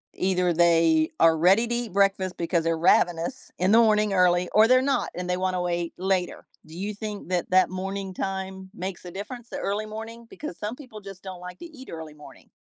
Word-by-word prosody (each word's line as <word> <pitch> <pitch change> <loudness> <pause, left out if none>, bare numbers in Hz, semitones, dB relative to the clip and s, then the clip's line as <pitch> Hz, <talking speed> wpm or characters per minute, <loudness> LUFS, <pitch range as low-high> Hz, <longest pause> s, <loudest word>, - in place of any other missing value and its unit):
either 180 -2 +1
they 165 -2 +4
are 165 -1 +5
ready 190 +8 +4
to 240 - -1
eat 240 -3 -3
breakfast 195 -1 +1
because 170 0 0
they're 165 0 0
ravenous 175 +7 +1
in 185 +4 +3
the 230 - +7
morning 215 -2 +3
early 180 -1 +3
or 220 +2 +6
they're 255 0 +6
not 275 +1 0
and 180 +1 -5
they 180 - +2
wanna 185 -1 -1
wait 175 -1 -2
later. 185 -1 -1 0.2
Do 160 +1 -12
you 205 +3 -3
think 210 -2 -6
that 180 -2 -1
that 185 0 +5
morning 195 +1 -4
time 190 0 -5
makes 190 -3 -6
a 180 - -8
difference, 225 +6 -8
the - - -5
early 205 +2 -2
morning? 225 +2 -8
Because 305 - -8
some 215 +4 -5
people 245 -7 -11
just 195 -2 -10
don't 185 -2 -8
like 180 +1 -9
to - - -8
eat 280 -6 -12
early 160 -2 -8
morning. 150 0 -15
190 Hz, 215 wpm, -25 LUFS, 175-215 Hz, 0.2 s, the